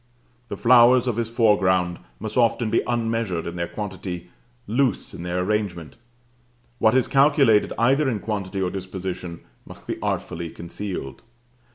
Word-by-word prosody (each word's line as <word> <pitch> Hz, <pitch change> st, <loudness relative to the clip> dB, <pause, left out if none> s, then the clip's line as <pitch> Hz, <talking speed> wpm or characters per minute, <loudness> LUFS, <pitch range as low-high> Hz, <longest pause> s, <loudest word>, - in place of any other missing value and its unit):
The -, -, -6 dB
flowers 120 Hz, +1 st, +6 dB
of 120 Hz, -3 st, -1 dB
his 115 Hz, -1 st, -1 dB
foreground 95 Hz, -6 st, +2 dB, 0.2 s
must 110 Hz, 0 st, -5 dB
often 115 Hz, -2 st, +2 dB
be -, -, +3 dB
unmeasured 115 Hz, -7 st, -1 dB
in 85 Hz, -, -5 dB
their 85 Hz, 0 st, -2 dB
quantity, 90 Hz, -4 st, -6 dB, 0.3 s
loose 125 Hz, +4 st, 0 dB
in -, -, -8 dB
their 90 Hz, +1 st, -2 dB
arrangement: 95 Hz, -5 st, -2 dB, 0.8 s
what 110 Hz, +2 st, +4 dB
is 130 Hz, -, +3 dB
calculated, 135 Hz, -6 st, +4 dB
either 135 Hz, +4 st, +3 dB
in 115 Hz, -, -1 dB
quantity 100 Hz, -2 st, -3 dB
or 90 Hz, -, -1 dB
disposition, 95 Hz, -2 st, -6 dB, 0.2 s
must -, -, -13 dB
be -, -, -5 dB
artfully 85 Hz, 0 st, -3 dB
concealed. 85 Hz, -4 st, -6 dB
105 Hz, 145 wpm, -23 LUFS, 90-120 Hz, 0.8 s, flowers